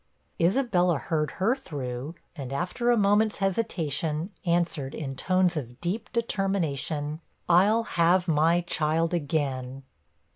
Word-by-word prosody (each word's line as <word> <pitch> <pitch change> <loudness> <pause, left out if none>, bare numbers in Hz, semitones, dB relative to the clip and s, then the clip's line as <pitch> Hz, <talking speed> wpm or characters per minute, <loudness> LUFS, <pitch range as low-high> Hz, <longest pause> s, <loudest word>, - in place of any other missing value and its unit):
Isabella 180 - +2
heard 150 +1 -1
her 220 +7 +1
through, 140 - -6 0.2
and 135 -5 -6
after 180 - -1
a 240 - +4
moment's 210 +1 +3
hesitation, 170 -5 -1 0.2
answered, 170 -5 0
in 135 -3 -5
tones 185 +3 +2
of 125 -5 -5
deep 195 +6 -3
determination 165 - -1 0.3
'I'll 200 +6 +4
have 175 -2 +2
my 165 +2 +3
child 165 0 0
again.' 135 -5 -2
170 Hz, 115 wpm, -27 LUFS, 150-195 Hz, 0.3 s, a